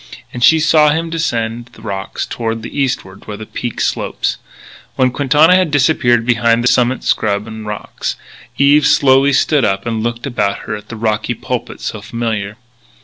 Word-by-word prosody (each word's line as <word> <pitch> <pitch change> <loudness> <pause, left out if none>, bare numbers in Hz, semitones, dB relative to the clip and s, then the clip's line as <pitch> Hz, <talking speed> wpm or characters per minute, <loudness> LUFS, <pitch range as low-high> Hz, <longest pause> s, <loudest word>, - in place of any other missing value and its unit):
And 120 - -3
she 160 +5 +6
saw 155 -1 +4
him 165 +2 -1
descend 120 -7 -2
the 110 - -16
rocks 100 -3 -4
to 115 -1 -3
the 115 0 -8
eastward, 125 -9 -3
where 105 - -6
the 110 - -8
peak 120 +2 -5
slopes. - - -1 0.6
When 130 -1 +2
Quintana 145 +6 +4
had 185 -3 +2
disappeared 130 -5 +2
behind 120 -1 +2
the - - +2
summit 125 +1 +2
scrub 100 -1 0
and 110 -1 -8
rocks, 105 -1 -4 0.4
Eve 145 +1 +4
slowly 135 0 +4
stood 140 0 +2
up 95 -2 0
and 115 -2 -2
looked 120 +1 -3
about 110 -7 -1
her 105 - -3
at 105 - -11
the 115 - -6
rocky 110 -1 -1
pulpit - - -5
so - - -5
familiar. 110 -3 -3
120 Hz, 175 wpm, -16 LUFS, 110-140 Hz, 0.6 s, she